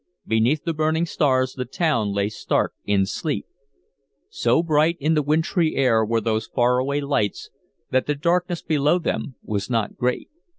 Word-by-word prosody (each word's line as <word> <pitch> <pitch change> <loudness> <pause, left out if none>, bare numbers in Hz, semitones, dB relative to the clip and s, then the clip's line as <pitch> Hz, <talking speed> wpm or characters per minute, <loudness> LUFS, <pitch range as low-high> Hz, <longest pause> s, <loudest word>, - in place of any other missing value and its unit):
Beneath 115 +7 +1
the 165 - -1
burning 160 +2 +1
stars 130 -5 +1
the 125 - -3
town 125 - 0
lay 100 0 0
stark 110 - -1
in 100 -1 +2
sleep. 150 - -3 0.9
So - - +2
bright 160 +1 +2
in 155 +3 +1
the 155 - +2
wintry 160 +3 +1
air 120 -5 +3
were 115 +1 +1
those 110 -1 -1
far 125 0 +2
away 140 +3 -1
lights 125 -8 -1 0.4
that 130 0 +1
the 150 - 0
darkness 175 +3 0
below 150 +1 +2
them 150 -6 -3
was 100 -2 -3
not 115 -4 -1
great. 125 0 -2
140 Hz, 165 wpm, -23 LUFS, 115-155 Hz, 0.9 s, air